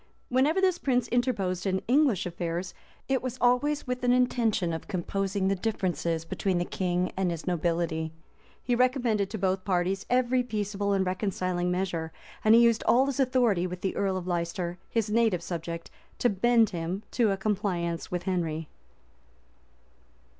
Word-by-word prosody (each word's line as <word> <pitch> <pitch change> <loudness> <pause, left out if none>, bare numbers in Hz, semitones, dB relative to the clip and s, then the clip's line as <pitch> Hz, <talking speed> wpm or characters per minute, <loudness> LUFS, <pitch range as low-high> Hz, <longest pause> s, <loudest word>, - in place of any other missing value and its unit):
Whenever 275 +8 +3
this 375 -2 +2
prince 250 -3 +1
interposed 205 -7 0
in 190 0 0
English 250 - +3
affairs, 175 +1 -3 0.3
it 265 -1 +1
was 255 -1 -4
always 280 +5 +2
with 250 -1 -3
an 245 - +4
intention 230 -8 +2
of 160 - -5
composing 195 +2 -1
the 195 - +3
differences 175 -5 -1
between 185 +2 -1
the 175 - 0
king 180 0 -1
and 190 -1 0
his 170 -2 -4
nobility: 165 -2 -1 0.5
he 245 - 0
recommended 240 -5 +2
to 220 - -4
both 190 -1 0
parties 185 0 0
every 250 0 +3
peaceable 205 -3 -2
and 190 -1 +1
reconciling 185 -2 -1
measure; 180 -3 -2 0.3
and 220 +1 +6
he 235 - +7
used 235 -1 +4
all 255 +3 +5
his 275 -1 -3
authority 245 -9 +2
with 180 0 -7
the 190 - -2
earl 195 -2 0
of 180 - -5
Leicester, 175 0 -2
his 225 -2 -1
native 220 -6 +2
subject, 170 -1 -5 0.3
to 245 - +2
bend 230 +3 +3
him 175 +3 -3
to 235 -4 +2
a 195 - 0
compliance 190 -5 -2
with 180 -1 -3
Henry. 165 -4 -2
195 Hz, 160 wpm, -28 LUFS, 175-240 Hz, 0.5 s, he